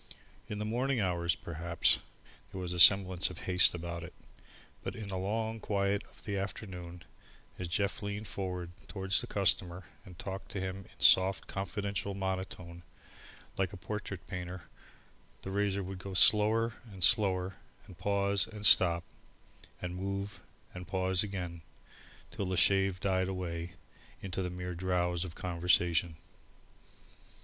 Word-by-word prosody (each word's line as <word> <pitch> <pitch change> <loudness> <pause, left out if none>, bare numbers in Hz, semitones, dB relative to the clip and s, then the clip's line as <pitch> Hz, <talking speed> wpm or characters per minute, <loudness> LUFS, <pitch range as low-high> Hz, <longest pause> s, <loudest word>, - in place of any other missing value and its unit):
In 105 - -4
the 105 - -3
morning 125 +4 0
hours, 85 -3 +1
perhaps, 85 0 +1 0.5
there 95 - -6
was 90 -1 -3
a 90 - -3
semblance 95 0 +6
of 90 - -9
haste 90 -1 +5
about 85 0 -5
it, 85 +1 -10 0.7
but - - -4
in 110 -3 -7
the 95 - -3
long 110 +3 -2
quiet 100 -1 0
of - - -19
the 100 -2 -2
afternoon, 90 -3 -6 0.6
as 90 - -3
Jeff 100 +4 -1
leaned 100 +1 -4
forward 90 -3 -4 0.2
towards 95 -1 0
the - - -4
customer, 90 -2 +1 0.2
and 90 -2 -13
talked 95 +2 -6
to 100 - -2
him 95 0 -3
in - - -22
a - - -1
soft 95 +1 +6
confidential 100 0 -3
monotone, 95 -3 -4 0.8
like 95 -1 0
a - - -7
portrait 95 -1 -6
painter, 90 -1 -6 0.8
the 95 - -5
razor 100 0 0
would 95 0 -6
go 95 +1 -7
slower 110 +4 +5 0.2
and 95 -2 -4
slower, 95 -3 +3 0.3
and 90 -3 -14
pause 100 +1 +1
and 105 -2 -5
stop, 85 -4 +6 0.8
move 100 +3 -4 0.3
and 90 -1 -8
pause 95 -1 +1
again, 90 -5 -4 0.7
till 100 - -3
the 95 -1 -1
shave 95 +1 +3
died 95 -1 +1
away 85 -2 -4 0.5
into 95 -1 -4
the 90 - -2
mere 90 0 -5
drowse 90 -1 0
of 85 -3 -7
conversation. 85 -1 +1
95 Hz, 145 wpm, -32 LUFS, 90-100 Hz, 0.8 s, semblance